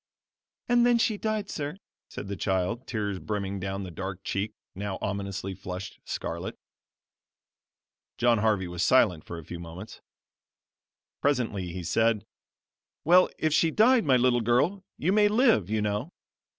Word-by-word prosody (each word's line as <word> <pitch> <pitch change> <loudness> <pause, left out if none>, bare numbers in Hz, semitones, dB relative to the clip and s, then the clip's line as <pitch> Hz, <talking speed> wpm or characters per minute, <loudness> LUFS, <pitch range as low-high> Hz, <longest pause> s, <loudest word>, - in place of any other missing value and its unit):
"And 240 0 +4
then 240 0 +5
she 225 -1 +2
died, 215 -1 -2
sir," 150 +3 -4 0.3
said - - -7
the 100 - -3
child; 95 +5 -1
tears 105 -4 -2
brimming 100 +2 -3
down 95 +1 -3
the 90 - -7
dark 95 +2 -6
cheek 105 +2 -2 0.2
now 95 0 -4
ominously 100 -1 -3
flushed 90 0 -7
scarlet. - - -4 1.6
John 120 -2 +3
Harvey 105 -4 +1
was 90 0 -4
silent 95 -9 +4
for 85 - -7
a 80 - -9
few 85 - -7
moments. 85 +6 -9 1.2
Presently 115 -10 0
he 90 +1 -5
said: 110 +5 +1 0.8
"Well, 180 +3 +6
if 155 -1 +1
she 165 - +4
died, 230 +8 +4
my 135 -5 +4
little 125 -1 +3
girl, 140 - +2
you 175 - +1
may 210 0 +5
live, 215 - +3
you 110 -1 0
know." 105 +10 -2
105 Hz, 150 wpm, -28 LUFS, 95-150 Hz, 1.6 s, Well